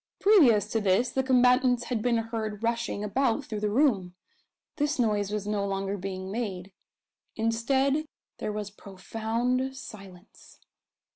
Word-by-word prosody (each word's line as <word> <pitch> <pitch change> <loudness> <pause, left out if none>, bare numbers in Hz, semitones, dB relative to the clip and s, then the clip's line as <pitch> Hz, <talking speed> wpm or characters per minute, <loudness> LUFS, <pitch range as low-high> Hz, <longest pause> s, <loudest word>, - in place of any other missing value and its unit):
Previous 275 - +5
to 225 - 0
this 205 +5 +2
the 265 - +1
combatants 250 -1 +3
had 235 -2 -2
been 235 0 +2
heard 225 -2 -4
rushing 230 -3 -1
about 255 +5 0
through 215 - -4
the 210 0 0
room. 205 -8 +1 0.6
This 295 0 0
noise 210 -5 +1
was 210 -1 -3
no 210 -1 -1
longer 195 0 -2
being 190 0 -5
made. 195 -4 -4 0.6
Instead 265 +6 +1 0.3
there - - -2
was 210 -1 -5
profound 225 +6 -3
silence. 195 -4 -13
225 Hz, 135 wpm, -28 LUFS, 205-250 Hz, 0.6 s, Previous